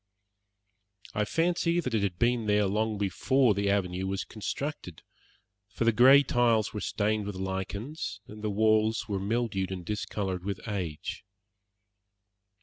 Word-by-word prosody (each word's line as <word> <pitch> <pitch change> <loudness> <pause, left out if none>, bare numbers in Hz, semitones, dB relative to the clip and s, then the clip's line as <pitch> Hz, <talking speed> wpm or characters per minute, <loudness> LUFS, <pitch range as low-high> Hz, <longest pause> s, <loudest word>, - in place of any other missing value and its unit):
I 105 - 0
fancy 170 +4 +1
that 130 -8 -3
it 110 - +2
had 95 -3 -1
been 120 0 +1
there 105 0 +3
long 105 +2 0
before 115 +5 +2
the 100 0 0
avenue 95 -2 0
was 95 0 -2
constructed, 110 - -5 0.7
for 105 +3 -2
the 115 - +5
grey 130 +5 +7
tiles 120 -4 +2
were 105 - -4
stained 105 0 -1
with 105 - -5
lichens, 95 - -4
and 105 -1 -11
the 105 - 0
walls 110 +1 +2
were 100 -3 -2
mildewed 100 -2 -1
and 90 -2 -5
discoloured 95 -2 -3
with 100 0 -3
age. 90 -8 -4
105 Hz, 145 wpm, -29 LUFS, 95-115 Hz, 0.7 s, grey